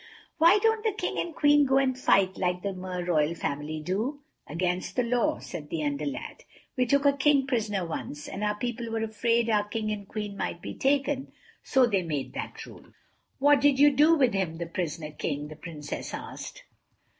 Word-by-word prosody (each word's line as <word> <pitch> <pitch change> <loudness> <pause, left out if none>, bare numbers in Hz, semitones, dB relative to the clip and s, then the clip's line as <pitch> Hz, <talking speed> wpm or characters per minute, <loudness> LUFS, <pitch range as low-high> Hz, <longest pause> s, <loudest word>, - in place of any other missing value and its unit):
"Why 340 +6 +7
don't 445 0 +2
the 440 -3 +1
King 420 - -3
and 335 -2 -3
Queen 290 -1 +5
go 270 -1 +3
and 265 -1 +2
fight, 195 -7 +3
like 180 -1 -1
the 200 -1 -2
Mer 180 -1 -5
Royal 160 -2 +1
Family 150 0 -3
do?" 215 - -2 0.3
"Against 180 +3 -2
the 250 - +2
law," 235 0 +1
said 150 -2 -8
the 160 -2 -2
Under 145 0 -1
lad. 145 - -6 0.3
"We 250 -1 +1
took 280 +3 +2
a 280 - +6
King 280 -1 +3
prisoner 215 -7 -1
once, 150 -2 -6
and 200 - -5
our 210 0 +1
people 240 +1 -4
were 225 0 -2
afraid 230 +1 +1
our 210 -2 +3
King 215 0 -2
and 205 -2 -5
Queen 210 -1 -5
might 175 - -3
be - - -6
taken, 275 0 0 0.3
so 265 -1 +3
they 200 -5 +1
made 150 -6 -3
that - - -6
rule." - - -13 0.5
"What 285 0 +5
did 285 -1 +4
you 290 +1 +7
do 300 +4 +5
with 260 -7 +3
him—the 170 -3 -2
prisoner 165 -3 -4
King?" 150 0 -4
the 155 - -9
Princess 150 -2 -6
asked. - - -8
215 Hz, 195 wpm, -27 LUFS, 170-270 Hz, 0.5 s, Why